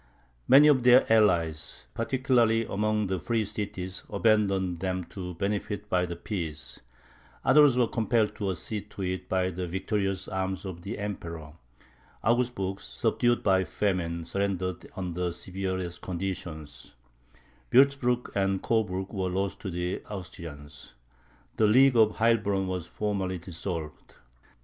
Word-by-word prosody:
Many 140 +4 +8
of 140 -4 +5
their 125 +1 +7
allies, 85 -8 +2
particularly 115 -2 +2
among 105 +1 0
the 95 -1 -1
free 115 +3 0
cities, 95 -3 -4
abandoned 100 -5 +2
them 95 0 -2
to 90 -2 -6
benefit 100 +2 -3
by 90 0 +2
the 85 - -5
peace; 85 -5 -5 0.7
others 145 -4 +6
were 125 - +5
compelled 115 -2 +1
to 100 -2 -1
accede 105 +3 -4
to 100 - -6
it 90 0 -3
by 95 0 +1
the 90 0 -4
victorious 95 +2 -2
arms 95 0 -3
of 90 -3 -6
the 100 +6 -5
Emperor. 85 -7 -6 0.7
Augsburg, 115 -5 0
subdued 120 0 0
by 95 -2 +3
famine, 85 -4 -1
surrendered 95 -2 -2
under 90 -1 -3
the 85 - -1
severest 95 -1 -4
conditions; 85 -7 -6 0.8
Wurtzburg 130 -2 +3
and 95 -1 0
Coburg 100 -4 0
were 95 -2 -1
lost 95 +1 -2
to 100 - -5
the 90 +1 -3
Austrians. 75 -9 -9 0.6
The 110 - +4
League 130 +4 +6
of 110 -2 +5
Heilbronn 110 -4 +2
was 90 -2 -3
formally 100 -3 -2
dissolved. 85 -2 -6
95 Hz, 130 wpm, -28 LUFS, 90-110 Hz, 0.8 s, Many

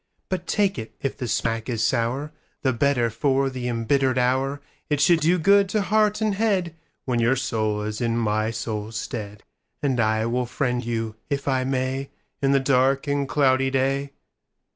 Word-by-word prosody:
But 180 -2 -3
take 200 - +1
it: 110 - -8
if 135 - -1
the 125 - -4
smack 115 0 -1
is 115 -3 0
sour, 130 +5 0 0.3
The 130 -2 +2
better 120 -2 +1
for 135 +3 +1
the 125 -1 -4
embittered 130 +3 +1
hour; 130 +3 +1 0.3
It 150 -2 +1
should 165 +3 +5
do 170 +3 +3
good 200 +3 +4
to 210 +1 +1
heart 210 +2 +2
and 215 -2 +1
headWhen 170 - -2
your 120 +3 +3
soul 110 -4 -1
is 105 +2 -4
in 115 -1 0
my 110 -1 0
soul's 110 -1 -4
stead; 105 -4 -6 0.4
And 135 -4 +1
I 110 0 +2
will 120 +1 -1
friend 125 -1 -1
you, 115 -1 -3
if 140 0 -2
I 130 -1 +1
may, 130 +1 -2 0.3
In 135 -1 +3
the 140 - +4
dark 135 0 +2
and 140 -1 -1
cloudy 135 -2 +3
day. 135 +1 0
130 Hz, 175 wpm, -24 LUFS, 115-140 Hz, 0.4 s, should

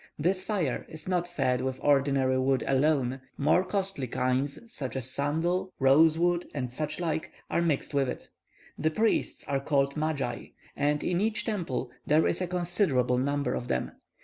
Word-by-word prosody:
This 185 +5 +1
fire 180 - -1
is 160 0 -9
not 180 -2 0
fed 130 -6 0
with 130 0 -2
ordinary 135 -2 +3
wood 130 0 +2
alone; 135 -2 +1 0.2
more 155 +6 +3
costly 190 -7 -2
kinds, 130 +3 0 0.2
such 135 - -4
as 130 0 -4
sandal, 170 +7 0
rose 155 +4 +5
wood, 175 +1 +1
and 125 -4 -2
such 150 +6 -3
like, 160 -2 -2 0.2
are - - +2
mixed 155 -3 0
with 140 -2 +2
it. - - -6 0.5
The 155 - +2
priests 220 +8 0
are 140 -1 0
called 140 0 +1
magi, 150 -5 -2 0.3
and 145 +1 +1
in 180 +1 0
each 220 +1 0
temple 160 - -2 0.2
there 155 +2 +4
is 170 - 0
a 180 - 0
considerable 170 - +1
number 140 +2 0
of 125 - -3
them. 65 - -1
145 Hz, 170 wpm, -28 LUFS, 130-175 Hz, 0.5 s, rose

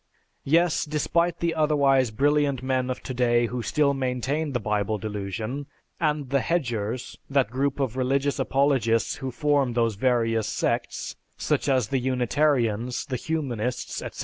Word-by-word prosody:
Yes, 165 +3 +3
despite 170 +3 0
the 170 -1 +1
otherwise 140 -5 +3
brilliant 140 +2 +1
men 130 -1 0
of 130 - -4
today 120 -2 +2
who 125 +1 -3
still 140 +3 +2
maintain 135 +3 -1
the 120 - 0
Bible 105 0 -1
Delusion, 110 +6 -4 0.3
and 150 -4 -1
the 140 - +3
"Hedgers," 120 -7 -2
that 135 -5 +2
group 140 +2 -1
of 130 -4 -1
religious 135 +2 0
apologists 135 -4 +1
who 135 -2 -4
form 140 -1 +1
those 115 -1 +1
various 115 -1 +1
sects, - - -2 0.2
such - - 0
as 130 -5 +2
the 135 - +1
Unitarians, 125 -2 +1
the 130 - -3
Humanists, 125 -5 -3
etc. - - -7
130 Hz, 145 wpm, -25 LUFS, 120-145 Hz, 0.3 s, Yes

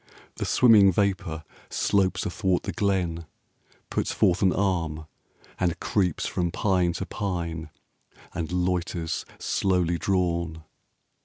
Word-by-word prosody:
The - - -2
swimming 110 -6 +6
vapour 95 -4 -1 0.3
slopes 95 -2 +1
athwart 95 -1 0
the - - -3
glen, 90 -5 -1 0.6
Puts - - -1
forth 90 0 +2
an 95 -2 +4
arm, 85 -6 -1 0.5
and 85 -2 0
creeps 90 -6 0
from 85 -1 -1
pine 90 -1 +1
to 95 +2 -4
pine, 85 -6 -4 0.6
And 85 -2 -4
loiters, 90 -2 -1
slowly 90 -3 0
drawn. 85 -4 -1
90 Hz, 110 wpm, -26 LUFS, 85-95 Hz, 0.6 s, swimming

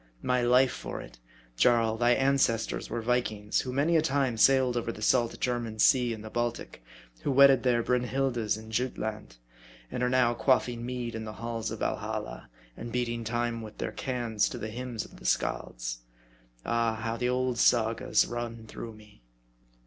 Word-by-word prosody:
My 125 0 +1
life 125 +1 +4
for - - -6
it, - - -12 0.4
Jarl, 115 - +3
thy 120 +1 +3
an 140 +1 +2
cestors 115 -4 0
were 115 - -3
Vikings, 110 -4 0
who 130 - -5
many 145 +6 +2
a 160 - +5
time 135 -5 0
sailed 130 +1 +4
over 115 -1 -1
the - - -11
salt 120 0 +2
German 120 -3 -2
sea 125 +2 +4
and 110 -2 -6
the 110 - -8
Baltic; 120 - -3 0.4
who - - -2
wedded 135 -1 +7
their 120 -2 +2
Brynhildas 125 -3 0
in 110 0 -11
Jutland; 110 - -3 0.5
and - - -3
are 125 - +2
now 125 -2 +3
quaffing 120 0 +1
mead 125 -1 -4
in 110 0 -5
the 110 -1 -6
halls 115 0 -3
of - - -7
Val - - 0
halla, - - -6 0.3
and 115 0 -7
beating 120 -1 -2
time 120 0 -2
with 110 -1 -10
their - - -3
cans 120 -5 -1
to - - -6
the 110 - -5
hymns 120 -1 -5
of - - -15
the - - -15
Scalds. - - -2 0.7
Ah! 115 -1 +1
how 115 +1 -3
the 125 +1 -1
old 125 -1 0
Sagas 115 -1 +3
run 115 -1 -5
through 115 +1 -8
me 105 - -18
120 Hz, 180 wpm, -29 LUFS, 110-125 Hz, 0.7 s, wedded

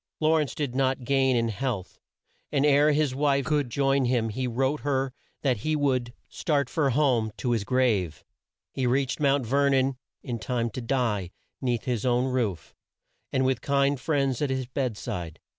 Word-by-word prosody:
Law 160 +1 +3
rence 150 -3 -2
did 145 -5 -2
not 130 0 0
gain 135 0 +2
in 115 -1 +1
health, 110 -4 -4 0.5
and 145 -1 +2
ere 145 +1 +5
his 150 -2 +1
wife 140 0 +1
could 145 -4 0
join 135 +1 +2
him 120 -2 +1
he 125 +4 -2
wrote 135 +5 0
her 135 -2 -1 0.3
that 130 -4 +2
he 155 +9 -1
would 130 -5 0 0.2
start 140 -5 -1
for 150 -4 +1
home 125 -5 +2
"to 125 - -1
his 115 -4 +1
grave." 105 -10 0 0.5
He 130 -2 -1
reached 130 +3 0
Mount 140 -3 +2
Ver 140 +4 +2
non 135 -1 +2 0.3
in 120 -2 -4
time 120 0 -2
to 130 - -5
die 115 -7 -1 0.3
'neath 120 -4 -1
his 120 -4 -2
own 125 0 +2
roof, 120 -9 -2 0.6
and 130 0 +1
with 130 -2 +1
kind 140 -1 +1
friends 135 -3 0
at 145 - +1
his 130 -1 -1
bed 125 -3 -2
side. 90 -10 -5
130 Hz, 180 wpm, -26 LUFS, 120-140 Hz, 0.6 s, ere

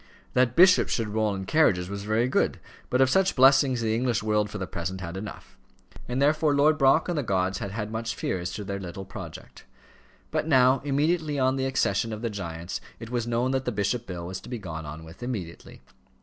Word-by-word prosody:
That 125 -1 +2
bishops 185 +1 +6
should 115 -3 -1
roll 105 -1 0
in 95 0 -5
carriages 95 - +3
was 100 +1 -6
very 110 +3 +1
good; 130 - +1 0.3
but 125 - +2
of 130 - +5
such 190 +3 +3
blessings 135 -1 +5
the 110 -1 0
English 120 -1 0
world 105 -1 +1
for - - -6
the 95 - -3
present 90 +2 -4
had 85 -1 -6
enough. 105 +3 -9 0.5
And 125 +1 -2
therefore 150 +1 +3
Lord 150 +2 +4
Brock 135 +3 +4
and 175 - -1
the 150 - 0
gods 95 -5 0
had 100 - -4
had 105 +1 -4
much 115 +1 -3
fear 95 - -2
as 90 +1 -4
to 105 - -5
their 100 0 -4
little 95 +1 -7
project. - - -10 0.7
But - - -1
now, 130 -2 +4
immediately 150 +2 0
on 130 0 +2
the 135 0 -1
accession 115 -4 0
of 110 +1 -6
the 115 - -1
giants, 85 -3 -5 0.2
it 115 0 -9
was 120 -2 -1
known 120 +2 0
that 130 0 -1
the 125 - 0
bishop 110 +3 -1
bill 90 -2 -6
was 90 +1 -6
to - - -12
be 125 - -3
gone 80 -7 -7
on 75 +2 -8
with 80 +6 -13
immediately. 105 -9 -6
115 Hz, 220 wpm, -26 LUFS, 95-130 Hz, 0.7 s, bishops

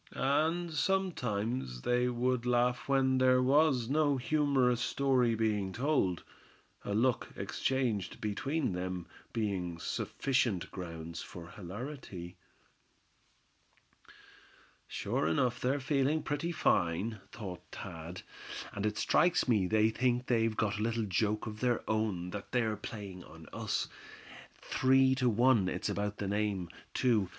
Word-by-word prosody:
And 160 +5 +1
sometimes 125 - -1
they 125 0 +2
would 125 0 0
laugh 125 +1 +1
when 130 -1 +3
there 130 0 +5
was 135 -2 +3
no 145 0 +2
humorous 130 -3 +2
story 125 -3 +2
being 105 -3 0
told; 120 - +1 0.6
a 100 - -2
look 120 +2 +2
exchanged 120 -8 -1
between 130 - -1
them 90 -1 -3 0.3
being 95 -6 -2
sufficient 120 +2 -1
grounds 85 -2 -6
for 85 -1 -9
hilarity. 100 - -7 1.7
"They're - - -18 0.7
sure - - -1
enough 120 +10 +1 0.2
feeling 140 +2 +1
pretty 145 +4 -2
fine," 100 - +1
thought 95 -6 -7
Thad; 85 +2 -7 0.5
"and 100 +2 -1
it 105 0 -2
strikes 165 +10 +3
me 105 -7 +3
they 110 +2 +3
think 125 +1 +1
they've 115 -3 +1
got 105 -1 0
a - - -2
little 115 0 0
joke 105 +2 0
of 105 -2 -6
their 125 -1 0
own 105 -5 -1
that 100 0 -7
they're 115 -3 +1
playing 100 -4 -7
on - - -13
us. - - -1 0.7
Three 130 0 +3
to 130 -2 +2
one 115 -3 +4
it's - - -2
about 105 0 -2
that 100 - -3
name, 100 -4 -1 0.3
too. 110 -7 +2
115 Hz, 125 wpm, -32 LUFS, 100-130 Hz, 1.7 s, there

